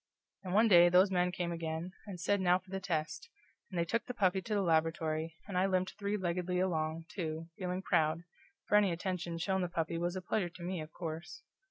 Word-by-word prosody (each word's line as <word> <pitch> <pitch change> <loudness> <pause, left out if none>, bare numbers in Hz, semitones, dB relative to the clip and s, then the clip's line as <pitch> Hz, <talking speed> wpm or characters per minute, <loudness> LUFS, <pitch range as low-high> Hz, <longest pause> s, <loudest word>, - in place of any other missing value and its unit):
And 185 0 -3
one 220 +2 +6
day 175 -4 +8
those 185 +2 +5
men 180 -1 +2
came 175 -1 -2
again, 165 +1 -3 0.2
and 190 -3 -7
said, 200 +3 +1
now 180 -1 +4
for 185 0 -16
the 195 - -2
test, 175 - -3 0.4
and 185 - -6
they 170 - +2
took 230 +7 -1
the 250 - -5
puppy 190 -3 +2
to 215 +2 -2
the 200 - +2
laboratory, 160 -1 0
and 200 - -6
I 185 +1 +3
limped 185 -1 0
three 205 0 -1
leggedly 180 -1 -1
along, 160 -3 -1
too, 165 -3 -4
feeling 185 0 -2
proud, 160 0 +2 0.4
for 210 - +5
any 205 -3 +4
attention 175 -1 -3
shown 190 +3 0
to 180 - 0
the - - -16
puppy 165 0 -1
was 175 +1 -1
a 185 - -3
pleasure 180 -1 0
to 170 +1 -11
me, 180 -1 -3
of 155 0 -8
course. 165 - -6
180 Hz, 225 wpm, -33 LUFS, 165-190 Hz, 0.4 s, day